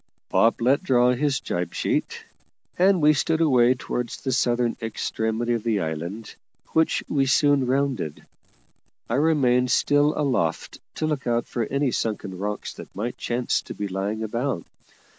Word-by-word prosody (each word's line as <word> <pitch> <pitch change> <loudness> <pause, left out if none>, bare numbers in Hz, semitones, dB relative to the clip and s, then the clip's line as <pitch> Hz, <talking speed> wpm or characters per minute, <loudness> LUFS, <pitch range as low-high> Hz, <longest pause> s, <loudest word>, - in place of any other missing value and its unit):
Bob 115 - +3
let 135 +6 +3
draw 125 -8 +3
his 135 +1 0
jib 90 -1 -3
sheet, - - -2 0.5
and 185 -2 +3
we 150 +1 +6
stood 160 +3 0
away 130 -6 +4
towards 120 0 -4
the 130 - -3
southern 120 -2 +1
extremity 115 +1 -2
of 115 - -1
the 110 -2 0
island, 85 +7 -5 0.4
which 160 0 +1
we 135 -2 +1
soon 140 -1 +3
rounded; 130 - -1 0.8
I - - -3
remaining 130 -4 +3
still 145 +4 +3
aloft 130 - -1 0.2
to 155 - -2
look 150 -4 -2
out 120 0 +1
for 120 -2 -2
any 140 -1 0
sunken 105 -5 -3
rocks 105 +1 -4
that - - -12
might 115 +5 -4
chance 120 +1 -1
to - - -9
be 105 - -3
lying 100 +3 -3
about. 115 -3 -2
125 Hz, 155 wpm, -24 LUFS, 110-140 Hz, 0.8 s, we